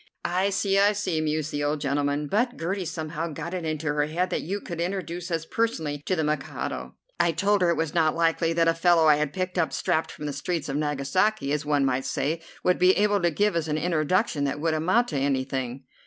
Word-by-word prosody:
"I 185 Hz, +3 st, +1 dB
see, 195 Hz, 0 st, +1 dB
I 205 Hz, +1 st, +5 dB
see," 185 Hz, -6 st, -1 dB
mused 155 Hz, 0 st, -1 dB
the 145 Hz, 0 st, -2 dB
old 145 Hz, +1 st, 0 dB
gentleman; 145 Hz, +1 st, 0 dB
"but 235 Hz, -, 0 dB
Gertie 185 Hz, +3 st, -2 dB
somehow 160 Hz, 0 st, -4 dB
got 160 Hz, +2 st, -6 dB
it 180 Hz, -3 st, -3 dB
into 155 Hz, 0 st, -3 dB
her 150 Hz, 0 st, +1 dB
head 180 Hz, +4 st, -1 dB
that -, -, 0 dB
you 195 Hz, +6 st, -3 dB
could 170 Hz, -4 st, -6 dB
introduce 175 Hz, -1 st, -3 dB
us 165 Hz, -2 st, -2 dB
personally 160 Hz, -10 st, -1 dB
to 185 Hz, -, +2 dB
the 160 Hz, -, 0 dB
Mikado. 135 Hz, -, -3 dB, 0.2 s
I 170 Hz, -, +3 dB
told 200 Hz, +4 st, +2 dB
her 175 Hz, -, +4 dB
it 170 Hz, -, +1 dB
was 160 Hz, -2 st, -1 dB
not 160 Hz, -2 st, +2 dB
likely 165 Hz, 0 st, +2 dB
that 165 Hz, 0 st, +2 dB
a 165 Hz, -, +4 dB
fellow 165 Hz, -1 st, +4 dB
I 150 Hz, -1 st, +6 dB
had 150 Hz, -1 st, -1 dB
picked 185 Hz, 0 st, -2 dB
up 165 Hz, -, +1 dB
strapped 160 Hz, -, 0 dB
from 150 Hz, -, -8 dB
the 145 Hz, -, -3 dB
streets 150 Hz, +2 st, -3 dB
of 135 Hz, -, -2 dB
Nagasaki, 145 Hz, +5 st, 0 dB
as 150 Hz, 0 st, -1 dB
one 145 Hz, -2 st, +2 dB
might 130 Hz, 0 st, 0 dB
say, 155 Hz, +5 st, -1 dB, 0.2 s
would 180 Hz, -, +2 dB
be 180 Hz, +1 st, +5 dB
able 205 Hz, -1 st, +2 dB
to 175 Hz, -, +3 dB
give 205 Hz, +4 st, +1 dB
us 165 Hz, -2 st, 0 dB
an 150 Hz, 0 st, 0 dB
introduction 165 Hz, 0 st, +1 dB
that 140 Hz, +1 st, -2 dB
would 160 Hz, +1 st, 0 dB
amount 185 Hz, +10 st, +2 dB
to 150 Hz, -, -2 dB
anything." 135 Hz, -1 st, -1 dB
160 Hz, 230 wpm, -26 LUFS, 150-180 Hz, 0.2 s, I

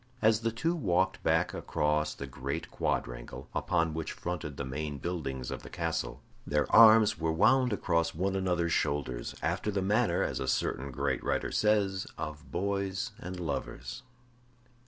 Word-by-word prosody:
As 110 Hz, -2 st, +4 dB
the 115 Hz, 0 st, 0 dB
two 145 Hz, +10 st, 0 dB
walked 95 Hz, -, +1 dB
back -, -, +2 dB
across 75 Hz, 0 st, 0 dB
the 70 Hz, -, -6 dB
great 70 Hz, +5 st, -5 dB
quadrangle, -, -, -3 dB
upon 85 Hz, -1 st, +1 dB
which 80 Hz, 0 st, -3 dB
fronted 80 Hz, -5 st, -5 dB
the 70 Hz, -, -3 dB
main 75 Hz, +2 st, -4 dB
buildings 70 Hz, -6 st, -4 dB
of -, -, -5 dB
the -, -, -10 dB
castle, -, -, -3 dB, 0.2 s
their 75 Hz, 0 st, +1 dB
arms 110 Hz, -1 st, +8 dB
were 80 Hz, -1 st, +1 dB
wound 125 Hz, +9 st, +4 dB
across 85 Hz, -5 st, 0 dB
one 95 Hz, +3 st, 0 dB
another's 90 Hz, -3 st, +1 dB
shoulders, 65 Hz, -4 st, -1 dB
after 85 Hz, +6 st, 0 dB
the 100 Hz, -2 st, 0 dB
manner, 110 Hz, +5 st, +2 dB
as -, -, -2 dB
a -, -, -3 dB
certain 70 Hz, +2 st, 0 dB
great 65 Hz, 0 st, -1 dB
writer -, -, -1 dB
says, 100 Hz, -3 st, +2 dB
of 75 Hz, 0 st, -6 dB
boys 100 Hz, 0 st, -1 dB
and 90 Hz, +1 st, -6 dB
lovers. 85 Hz, -, -4 dB
85 Hz, 155 wpm, -30 LUFS, 75-100 Hz, 0.2 s, arms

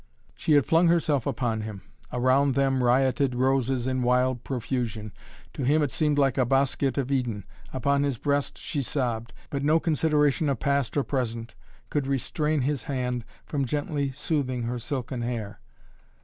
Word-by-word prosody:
She 155 Hz, -, +1 dB
had 145 Hz, -2 st, +5 dB
flung 165 Hz, +2 st, +4 dB
herself 155 Hz, -6 st, +2 dB
upon 115 Hz, -4 st, -1 dB
him. 105 Hz, -3 st, -7 dB, 0.3 s
Around 130 Hz, +2 st, +3 dB
them 135 Hz, -2 st, +2 dB
rioted 130 Hz, +1 st, +2 dB
roses 130 Hz, -1 st, +1 dB
in 130 Hz, -1 st, 0 dB
wild 125 Hz, 0 st, +2 dB
profusion. 120 Hz, -4 st, -3 dB, 0.4 s
To -, -, -5 dB
him 150 Hz, +4 st, +3 dB
it 140 Hz, -, -1 dB
seemed 150 Hz, +3 st, +1 dB
like 135 Hz, -3 st, +2 dB
a -, -, +5 dB
bosquet 135 Hz, +2 st, +1 dB
of 135 Hz, 0 st, -2 dB
Eden. 120 Hz, -7 st, -1 dB, 0.3 s
Upon 140 Hz, +2 st, +1 dB
his 140 Hz, -3 st, 0 dB
breast 145 Hz, +3 st, -1 dB
she 145 Hz, -, -3 dB
sobbed. 120 Hz, -4 st, -2 dB, 0.2 s
But 140 Hz, -, -2 dB
no 155 Hz, +3 st, +4 dB
consideration 150 Hz, -2 st, +2 dB
of 135 Hz, -5 st, -1 dB
past 140 Hz, -2 st, 0 dB
or 140 Hz, -, +3 dB
present 115 Hz, -4 st, -3 dB, 0.4 s
could 145 Hz, -3 st, 0 dB
restrain 150 Hz, +3 st, 0 dB
his 145 Hz, +3 st, -1 dB
hand 125 Hz, -3 st, -2 dB, 0.2 s
from 145 Hz, -2 st, -1 dB
gently 145 Hz, +1 st, -1 dB
soothing 130 Hz, -3 st, -1 dB
her 120 Hz, +1 st, -2 dB
silken 125 Hz, 0 st, -4 dB
hair. 115 Hz, -4 st, -4 dB
135 Hz, 165 wpm, -26 LUFS, 125-145 Hz, 0.4 s, had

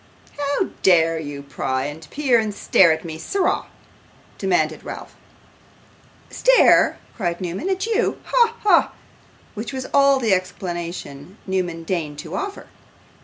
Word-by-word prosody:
'How 285 Hz, +6 st, -1 dB
dare 165 Hz, -3 st, +4 dB
you 145 Hz, -2 st, -7 dB
pry, 130 Hz, -1 st, -2 dB
and 145 Hz, +1 st, -8 dB
peer, 265 Hz, -, +2 dB
and 215 Hz, -2 st, -2 dB
stare 175 Hz, -4 st, +4 dB
at 160 Hz, +1 st, -2 dB
me, 160 Hz, -1 st, -6 dB
sirrah?' 385 Hz, -, -1 dB, 0.7 s
demanded 160 Hz, -5 st, 0 dB
Ralph. -, -, -8 dB, 1.2 s
'Stare!' -, -, +5 dB, 0.2 s
cried 175 Hz, -5 st, -2 dB
Newman, 185 Hz, -, -4 dB
'at 380 Hz, 0 st, -1 dB
YOU! 460 Hz, +1 st, 0 dB
Ha, 470 Hz, -2 st, +2 dB
ha!' 420 Hz, -, +4 dB, 0.6 s
which 215 Hz, 0 st, -5 dB
was 260 Hz, -1 st, -5 dB
all 275 Hz, -1 st, +5 dB
the 225 Hz, -5 st, +2 dB
explanation 175 Hz, -3 st, -5 dB
Newman 180 Hz, -3 st, -2 dB
deigned 160 Hz, -4 st, -3 dB
to 160 Hz, +2 st, -8 dB
offer. 400 Hz, -, -5 dB
185 Hz, 130 wpm, -21 LUFS, -, 1.2 s, Stare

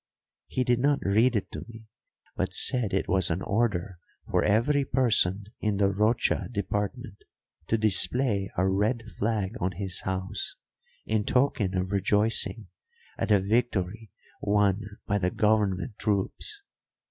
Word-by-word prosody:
He 130 Hz, -, -1 dB
did 120 Hz, -1 st, +2 dB
not 140 Hz, +2 st, +3 dB
read 110 Hz, +6 st, +3 dB
it 105 Hz, -, -2 dB
to -, -, -6 dB
me, 115 Hz, -1 st, -11 dB, 0.5 s
but -, -, -1 dB
said 125 Hz, -6 st, +2 dB
it 95 Hz, -, 0 dB
was 95 Hz, -2 st, +2 dB
an 90 Hz, +3 st, -1 dB
order 100 Hz, -4 st, -1 dB, 0.3 s
for -, -, +2 dB
every 120 Hz, +8 st, +2 dB
person 105 Hz, -7 st, +2 dB, 0.2 s
in 105 Hz, -2 st, 0 dB
the 100 Hz, -1 st, +3 dB
Rocha 105 Hz, +4 st, +1 dB
department 105 Hz, +2 st, -3 dB, 0.4 s
to 115 Hz, -, +2 dB
display 110 Hz, 0 st, +1 dB
a 95 Hz, +2 st, +2 dB
red 105 Hz, +5 st, +1 dB, 0.2 s
flag 105 Hz, -2 st, 0 dB
on 95 Hz, +1 st, -1 dB
his 95 Hz, 0 st, -4 dB
house 95 Hz, -, -4 dB, 0.5 s
in 110 Hz, -1 st, 0 dB
token 115 Hz, -6 st, +1 dB
of 95 Hz, +1 st, -1 dB
rejoicing 105 Hz, +2 st, +1 dB, 0.5 s
at -, -, -1 dB
a 105 Hz, -2 st, +5 dB
victory 110 Hz, 0 st, -1 dB, 0.3 s
won 100 Hz, -1 st, +2 dB, 0.2 s
by 100 Hz, 0 st, 0 dB
the 90 Hz, -1 st, +1 dB
government 105 Hz, +1 st, 0 dB
troops. 105 Hz, -, -2 dB
105 Hz, 140 wpm, -27 LUFS, 95-115 Hz, 0.5 s, a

